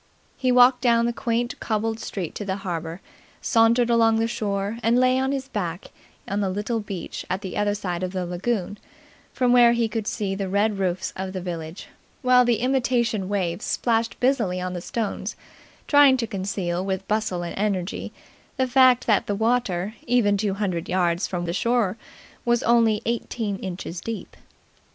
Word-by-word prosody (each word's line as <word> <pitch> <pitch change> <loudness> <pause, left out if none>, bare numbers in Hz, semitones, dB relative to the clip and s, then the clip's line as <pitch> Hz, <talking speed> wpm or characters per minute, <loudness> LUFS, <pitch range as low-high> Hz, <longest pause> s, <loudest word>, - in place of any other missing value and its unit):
He 255 -1 +1
walked 250 0 +6
down 235 -1 +3
the 240 - 0
quaint 235 +1 -2
cobbled 220 0 -1
street 185 -7 -5
to - - -5
the 190 -1 -2
harbour, 165 0 -4 0.4
sauntered 235 0 +3
along 225 -1 +4
the 225 0 +1
shore, 205 -1 -2
and 230 +2 +3
lay 255 +1 +3
on 265 +1 0
his 270 -1 -3
back 180 -7 -4 0.4
on 200 - -1
the 200 -2 0
little 210 +4 -2
beach 195 -5 -6
at 185 +2 -2
the 190 -3 -6
other 205 0 +1
side 180 -4 -3
of 185 -1 -2
the 185 -1 -3
lagoon, 195 +3 -2 0.5
from 250 -1 +2
where 240 -1 +7
he 235 -1 +1
could 220 -1 -4
see 200 -3 -2
the 195 -1 -3
red 200 +1 +1
roofs 185 -1 -1
of 190 0 -5
the 185 - -3
village, 170 -1 -6 0.4
while 250 0 +6
the 240 -2 +1
imitation 240 -6 +1
waves 185 -3 -1
splashed 230 -1 0
busily 235 -9 +1
on 180 0 -3
the 175 - -4
stones, 220 +3 -3 0.5
trying 285 -3 +6
to 240 - -1
conceal 190 -3 -3
with 190 -1 -3
bustle 210 -5 -1
and 170 - -5
energy 195 -2 -2 0.5
the 260 - +2
fact 255 -1 +5
that 215 -4 +2
the 205 - 0
water 215 -4 0
even 235 -4 +3
two 200 -1 -1
hundred 185 -5 -2
yards 175 0 +1
from 175 -2 -3
the 170 - -2
shore 230 -1 +1 0.5
was 240 -1 +1
only 230 -2 +3
eighteen 230 -2 -2
inches 180 -2 -6
deep. 230 +1 -6
210 Hz, 180 wpm, -24 LUFS, 185-235 Hz, 0.5 s, where